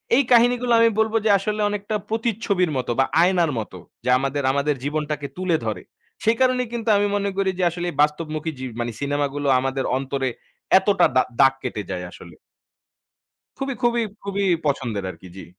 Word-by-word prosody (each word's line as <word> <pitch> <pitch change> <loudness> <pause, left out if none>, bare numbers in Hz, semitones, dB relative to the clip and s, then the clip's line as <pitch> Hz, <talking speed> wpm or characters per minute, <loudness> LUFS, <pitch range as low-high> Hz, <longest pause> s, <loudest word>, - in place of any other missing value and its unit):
এই 275 - +4
কাহিনীগুলো 245 +1 +4
আমি 230 0 +6
বলব 220 0 +1
যে - - +3
আসলে 210 +1 -2
অনেকটা 205 +1 -3
প্রতিচ্ছবির 215 -6 0
মতো 125 - -2
বা 135 - +5 0.2
আয়নার 175 -3 +3
মতো 100 -4 -7 0.3
যে 125 - -1
আমাদের 135 +1 -2
আমাদের 140 +1 0
জীবনটাকে 150 -1 -2
তুলে 185 -3 +1
ধরে। 110 - -3 0.4
সেই 225 +1 +3
কারণেই 255 -1 +2
কিন্তু 230 -1 -2
আমি 205 0 +2
মনে 200 0 0
করি 195 -1 +1
যে - - +1
আসলে 175 +1 -4
বাস্তবমুখী 155 +1 -1
জি 130 - -6
মানি 120 0 -2
সিনেমাগুলো 145 0 -1
আমাদের 135 0 -2
অন্তরে 135 0 -2 0.5
এতটা 190 -2 +3
দা 130 - +5 0.2
দাগ 135 -1 +6
কেটে 110 -5 -3
যায় 90 -1 -4
আসলে। 85 - -13 1.2
খুবই, 270 -1 -3
খুবই, 240 -1 +2 0.2
খুবই 200 0 -1 0.2
পছন্দের 120 -8 -1
আরকি। 90 +2 -14
জি। 95 - -8
160 Hz, 170 wpm, -22 LUFS, 135-215 Hz, 1.2 s, আমি